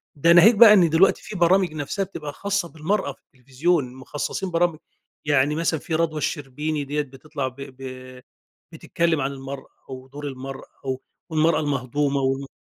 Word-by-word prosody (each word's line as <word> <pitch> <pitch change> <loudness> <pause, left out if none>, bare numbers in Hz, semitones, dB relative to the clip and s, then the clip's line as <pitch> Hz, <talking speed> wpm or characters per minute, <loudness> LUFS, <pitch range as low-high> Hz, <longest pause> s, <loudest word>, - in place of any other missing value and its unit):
ده 165 +4 +4
ناهيك 200 +7 +7
بقى 210 0 +9
إن 175 -5 +5
دلوقتي 165 +5 +3
في 215 - -8
برامج 175 -1 +3
نَفْسها 155 +6 -2
بتبقى 150 -6 -7
خاصة 200 -2 -2
بالمَرأة 160 +1 -1
في - - -30
التلفزيون، 135 +2 -1
مخصصين 145 +8 -4
برامج 170 -2 +1 0.5
يعني 145 0 +2
مثلًا 165 -1 0
في 160 +1 -3
رضوى 160 -1 0
الشربيني 150 +1 -3
ديَّة 145 +2 -1
بتطلَع 140 0 -5
ب 130 - -9
ب 130 -1 -9 0.5
بتتكلم 165 -1 -1
عن 135 +1 -1
المَرأة 135 0 -8 0.2
و 130 0 -9
دُور 145 +2 -8
المَرأة 135 0 -7 0.2
و 130 -1 -1 0.3
والمَرأة 160 +1 +2
المهضومة 140 0 -1
و 135 +1 -1
150 Hz, 160 wpm, -23 LUFS, 135-170 Hz, 0.5 s, بقى